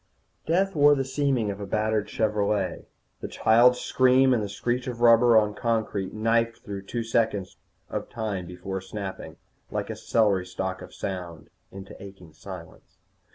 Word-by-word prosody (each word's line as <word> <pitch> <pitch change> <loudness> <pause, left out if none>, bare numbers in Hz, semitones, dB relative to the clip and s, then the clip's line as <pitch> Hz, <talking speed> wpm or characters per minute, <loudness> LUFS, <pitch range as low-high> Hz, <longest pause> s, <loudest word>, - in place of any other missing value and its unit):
_ - - -41
Death 190 +4 +1
wore 145 0 +6
the 135 -1 -1
seeming 130 -5 0
of 100 - -7
a 100 - -6
battered 110 +1 0
Chevrolet. 105 -3 -1 0.3
The - - -5
child's 120 +3 +4
scream 130 0 +4
and 120 - +1
the 105 - -4
screech 120 +5 -2
of 120 -2 -5
rubber 120 0 +6
on 105 -1 +3
concrete 110 -5 -1
knifed 115 +1 0
through 100 -1 -7
two 120 -1 -3
seconds 110 -4 -1 0.3
of - - -5
time 105 -6 -4
before 95 +2 -6
snapping, 95 0 -7 0.3
like - - -3
a - - -5
celery 100 -5 +1
stalk 95 +1 -4
of - - -10
sound, 85 -5 -6 0.2
into 95 0 -10
aching 95 -5 -12
silence. 90 +1 -11
105 Hz, 160 wpm, -26 LUFS, 95-120 Hz, 0.3 s, wore